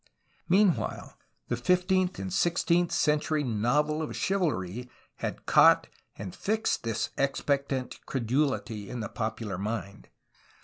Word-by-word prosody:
Meanwhile 190 -1 +2 0.3
the 120 - 0
fifteenth 180 +7 +2
and 190 - -4
sixteenth 175 -1 +2
century 150 -2 +1
novel 140 +7 +1
of 155 - -4
chivalry 125 - -1 0.3
had - - -5
caught - - +6 0.3
and 95 -3 -7
fixed 220 +2 0
this 115 -2 -2
expec 140 0 +1
tant 130 -2 -4
credulity 120 -4 -1
in 125 -2 -4
the - - -4
popular 110 -4 -4
mind. 100 -2 -4
140 Hz, 120 wpm, -28 LUFS, 115-170 Hz, 0.3 s, caught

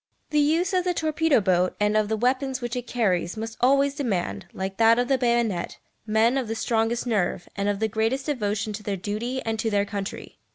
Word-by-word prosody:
The 300 - +3
use 320 +6 +2
of 365 -1 +2
the 360 -1 0
torpedo 315 -3 +2
boat 185 -1 +2
and 210 0 +2
of 215 -1 +2
the 220 - 0
weapons 260 +3 0
which 240 -1 -4
it 245 -1 -4
carries 190 -5 0
must 225 +1 -5
always 275 +2 +4
demand, 200 - -2
like 190 0 -5
that 230 0 +5
of 245 0 +1
the 270 - +3
bayonet, 235 -7 0 0.3
men 225 +5 +3
of 255 - -3
the 225 - -3
strongest 225 +1 0
nerve, 195 -6 -1
and 200 0 0
of 205 - 0
the 220 - +1
greatest 225 +5 -1
devotion 215 -6 -1
to 210 - -6
their 205 -1 -3
duty 220 +7 -3
and 225 -1 -2
to 225 - 0
their 205 -1 +1
country. 200 -1 -6
225 Hz, 215 wpm, -25 LUFS, 205-255 Hz, 0.3 s, that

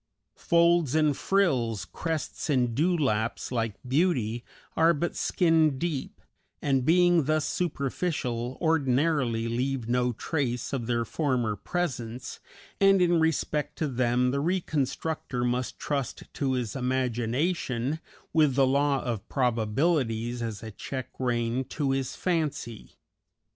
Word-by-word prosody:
Folds 170 -4 +3
and 155 -2 +3
frills, 125 - +1
crests 160 - -4
and 125 -4 +2
dewlaps, 135 -9 0
like 115 -4 -1
beauty, 125 -6 +1 0.3
are 165 +1 +4
but 170 +4 -2
skin 160 -5 +2
deep, 160 -3 -3 0.4
and, 135 -3 +1
being 175 +1 +4
thus 155 +1 +1
superficial, 135 -6 -2
ordinarily 135 -6 +1
leave 125 +1 -1
no 125 +1 +1
trace 125 0 -2
of 120 -4 -2
their 120 -1 0
former 125 -5 0
presence, 125 - -4 0.4
and 195 -1 +5
in 175 -2 +4
respect 150 -2 0
to 155 - 0
them 125 -1 +1
the 140 - 0
reconstructor 155 -5 -1
must 125 +1 -1
trust 140 -4 -3
to 135 -2 -1
his 120 -5 -2
imagination, 130 +2 -1 0.3
with 150 -5 +4
the 135 -1 +5
law 140 +1 +2
of 115 -5 -4
probabilities 120 -1 0
as 115 -3 -4
a 110 - -6
check 130 +4 -6
rein 120 0 0
to 135 +1 -1
his 135 -1 -2
fancy. 150 - -2
135 Hz, 120 wpm, -27 LUFS, 120-160 Hz, 0.4 s, and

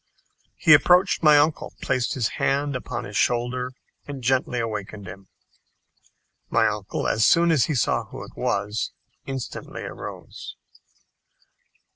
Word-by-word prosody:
He 155 - +6
approached 180 +6 +5
my 150 -2 +7
uncle, 150 +2 +1
placed 125 -2 0
his 120 -5 +1
hand 140 0 +1
upon 125 - -4
his 100 - -8
shoulder, 125 +2 0 0.4
and 140 -3 -7
gently 130 0 +1
awakened 105 -3 -5
him. 95 +1 -10 1.2
My - - +3
uncle, - - -3
as 110 - +2
soon 170 +5 +5
as 150 -6 +4
he 155 - -2
saw 115 - +1
who - - -9
it - - -13
was, 105 +2 -2 0.3
instantly 135 -2 -6
arose. - - -8
130 Hz, 130 wpm, -24 LUFS, 110-145 Hz, 1.2 s, my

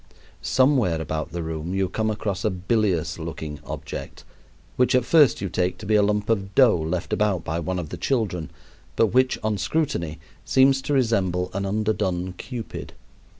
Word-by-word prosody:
Somewhere 130 - +2
about 80 0 -3
the 85 -1 -4
room 80 +3 -4
you 95 -1 +1
come 110 +3 -1
across 100 -2 -2
a - - +2
bilious 95 -2 0
looking 75 -2 -6
object, - - -7 0.5
which 125 0 +3
at 125 -2 +3
first 150 - +5
you 100 - -1
take 90 0 -1
to 110 - -9
be 110 - 0
a 105 - +6
lump 105 0 +1
of 100 -3 -1
dough 120 -10 +6
left 80 +2 -2
about 100 -5 +1
by 80 +2 -2
one 90 +2 -2
of 85 -4 -4
the - - -6
children, 100 - -1 0.5
but 110 -2 +2
which 130 0 +3
on 105 -2 0
scrutiny 100 - -1 0.2
seems 135 0 +4
to 135 +2 -2
resemble 95 -9 +1
an 100 +1 -2
underdone 95 -3 -1
cupid. 115 +4 -7
100 Hz, 175 wpm, -24 LUFS, 90-115 Hz, 0.5 s, a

